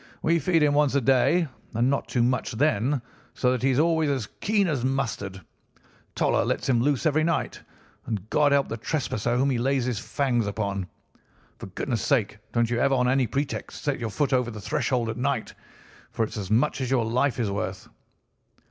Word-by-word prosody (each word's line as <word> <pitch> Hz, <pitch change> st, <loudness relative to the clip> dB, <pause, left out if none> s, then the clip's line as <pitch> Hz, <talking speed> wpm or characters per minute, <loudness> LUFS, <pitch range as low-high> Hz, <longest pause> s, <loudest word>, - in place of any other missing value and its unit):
We 170 Hz, +1 st, +3 dB
feed 165 Hz, +1 st, +2 dB
him 145 Hz, -1 st, +3 dB
once 145 Hz, -2 st, +2 dB
a 140 Hz, -, +3 dB
day, 135 Hz, +7 st, +3 dB, 0.3 s
and 120 Hz, +2 st, +2 dB
not 140 Hz, -, -1 dB
too 120 Hz, -, +1 dB
much 125 Hz, +1 st, 0 dB
then, 125 Hz, +1 st, +1 dB, 0.3 s
so 125 Hz, -, +2 dB
that 125 Hz, -, -1 dB
he 135 Hz, -, +2 dB
is 130 Hz, -, +1 dB
always 160 Hz, 0 st, +2 dB
as 135 Hz, -6 st, -1 dB
keen 205 Hz, -2 st, +2 dB
as 145 Hz, -7 st, -1 dB
mustard. 120 Hz, -8 st, -2 dB, 0.8 s
Toller -, -, +2 dB
lets -, -, -2 dB
him 120 Hz, -3 st, +3 dB
loose 140 Hz, +3 st, +1 dB
every 155 Hz, 0 st, +3 dB
night, 165 Hz, 0 st, -1 dB, 0.5 s
and 105 Hz, -3 st, -3 dB
God 150 Hz, -1 st, +3 dB
help 140 Hz, -1 st, +3 dB
the 115 Hz, -, -4 dB
trespasser 120 Hz, -3 st, -1 dB
whom 135 Hz, +2 st, +2 dB
he 125 Hz, -, 0 dB
lays 135 Hz, 0 st, +1 dB
his 125 Hz, -4 st, -1 dB
fangs 125 Hz, -6 st, 0 dB
upon. 100 Hz, -2 st, -2 dB, 0.7 s
For -, -, -7 dB
goodness' 115 Hz, +4 st, -3 dB
sake 110 Hz, -6 st, 0 dB
don't 115 Hz, -1 st, +1 dB
you 120 Hz, -, +1 dB
ever 135 Hz, +2 st, +3 dB
on 125 Hz, -1 st, +2 dB
any 130 Hz, -1 st, +2 dB
pretext 140 Hz, +3 st, -4 dB
set 145 Hz, -2 st, -1 dB
your 115 Hz, -2 st, -3 dB
foot 140 Hz, +5 st, 0 dB
over 125 Hz, -2 st, +2 dB
the 110 Hz, -2 st, -7 dB
threshold 125 Hz, 0 st, -1 dB
at 110 Hz, +1 st, -4 dB
night, 130 Hz, -2 st, -1 dB, 0.6 s
for 115 Hz, -, -1 dB
it's 110 Hz, -, -9 dB
as 100 Hz, -4 st, -5 dB
much 125 Hz, +6 st, +2 dB
as 130 Hz, -, -2 dB
your 125 Hz, -4 st, +2 dB
life 125 Hz, +2 st, 0 dB
is 110 Hz, -4 st, 0 dB
worth. 95 Hz, -1 st, -4 dB
130 Hz, 200 wpm, -26 LUFS, 115-140 Hz, 0.8 s, We